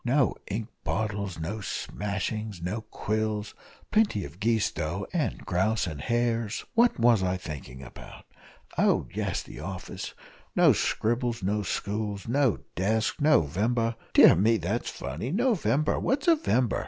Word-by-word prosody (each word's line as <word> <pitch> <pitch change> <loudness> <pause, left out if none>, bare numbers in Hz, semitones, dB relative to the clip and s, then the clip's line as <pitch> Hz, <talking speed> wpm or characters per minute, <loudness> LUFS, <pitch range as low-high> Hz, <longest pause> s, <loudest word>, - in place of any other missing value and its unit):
no 130 +1 +3 0.2
ink 105 +2 -3 0.2
bottles, 100 0 -2
no 90 +7 -3
smashings, 105 +1 -3
no 90 +7 -3
quills, 110 -1 -2 0.4
plenty 210 - +2
of 90 - -11
geese, 110 0 +2
though, 85 +6 -3
and 165 -4 -1
grouse 105 +4 +1
and 75 -5 -5
hares 115 - 0
what 235 - +4
was 115 -3 +5
I 95 0 0
thinking 70 -6 -8
about? 65 - -12 0.5
Oh, - - +3
yes - - -2
the - - -11
office 95 +4 -6 0.4
no - - +6
scribbles 120 -1 0
no 105 +3 +1
stools, 105 +1 -3
no 130 -1 +2 0.2
desks, 110 - 0
No 150 - +5
vember 115 +9 0 0.2
dear - - +8
me, 110 +6 +3
that's 105 +6 -2
funny! 80 - -5
No 245 +8 +2
vember 155 -6 +1
what's 275 +4 0
a 335 - +7
vember? 130 - +1
110 Hz, 145 wpm, -28 LUFS, 95-120 Hz, 0.5 s, dear